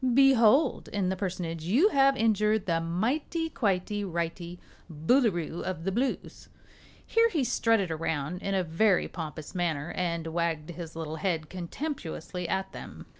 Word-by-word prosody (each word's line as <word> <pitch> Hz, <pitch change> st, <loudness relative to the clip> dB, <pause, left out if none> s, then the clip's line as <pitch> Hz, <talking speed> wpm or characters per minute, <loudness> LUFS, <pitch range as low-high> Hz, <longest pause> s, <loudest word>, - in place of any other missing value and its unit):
Behold 270 Hz, 0 st, +5 dB
in 195 Hz, -3 st, -1 dB
the 190 Hz, -, 0 dB
Personage 175 Hz, -4 st, -4 dB
you 250 Hz, -, +4 dB
have 275 Hz, -5 st, +4 dB
injured 215 Hz, -1 st, +2 dB
the 165 Hz, -2 st, +1 dB
Mighty 265 Hz, -, -1 dB
Quitey 205 Hz, -1 st, 0 dB
Righty 170 Hz, -1 st, -4 dB, 0.3 s
Boolooroo 175 Hz, -, +1 dB
of 180 Hz, -3 st, -4 dB
the 195 Hz, -, -1 dB
Blues!" 250 Hz, +6 st, -3 dB, 0.6 s
Here 460 Hz, 0 st, +3 dB
he 315 Hz, -10 st, 0 dB
strutted 225 Hz, -7 st, +2 dB
around 160 Hz, +1 st, -2 dB
in 195 Hz, 0 st, -1 dB
a 190 Hz, -, +2 dB
very 180 Hz, +4 st, +2 dB
pompous 155 Hz, -2 st, -7 dB
manner 165 Hz, -4 st, -1 dB
and 170 Hz, -2 st, -2 dB
wagged 165 Hz, -1 st, -2 dB
his 165 Hz, -1 st, -8 dB
little 160 Hz, -1 st, -4 dB
head 165 Hz, -4 st, -2 dB
contemptuously 180 Hz, -, -5 dB
at 190 Hz, 0 st, -1 dB
them. -, -, -9 dB
180 Hz, 145 wpm, -28 LUFS, 165-220 Hz, 0.6 s, Behold